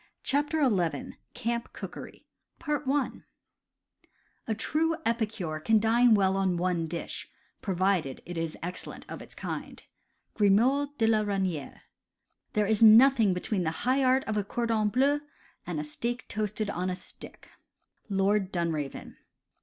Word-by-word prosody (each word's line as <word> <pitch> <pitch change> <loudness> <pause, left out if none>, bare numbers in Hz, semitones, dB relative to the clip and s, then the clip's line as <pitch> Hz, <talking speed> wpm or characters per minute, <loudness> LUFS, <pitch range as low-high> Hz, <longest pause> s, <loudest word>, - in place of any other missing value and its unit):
CHAPTER 290 +1 +2
XI 180 -8 -1 0.2
CAMP 235 +1 -3
COOKERY - - -9 2.2
"A 220 - 0
true 325 +7 +1
epicure 215 -9 -1
can 220 +8 +3
dine 230 +1 +5
well 190 -1 +2
on 190 -2 +1
one 175 -2 0
dish, 170 +1 -5 0.3
provided 185 -7 0
it 175 - -7
is 165 -1 -3
excellent 180 +1 -6
of - - -7
its - - -11
kind." - - -6 0.3
— - - -47
Grimod 260 +8 +3
de 225 - +2
la 220 -1 +4
Reyniere. 190 -7 -2 0.7
"There 210 0 +2
is 215 +1 +1
nothing 225 -2 +7
between 185 +2 -1
the 160 - +1 0.2
high 265 +2 +3
art 260 +1 +3
of 215 -1 -2
a 205 - +1
cordon 225 0 0
bleu 275 +6 +2 0.5
and 170 -4 -2
a - - -2
steak 235 +11 -4
toasted 210 0 -2
on 180 +1 -2
a 180 - -2
stick." 180 - -12 0.3
— - - -47 0.3
Lord 195 0 +1
Dunraven. 160 -6 -3
210 Hz, 140 wpm, -28 LUFS, 180-235 Hz, 2.2 s, nothing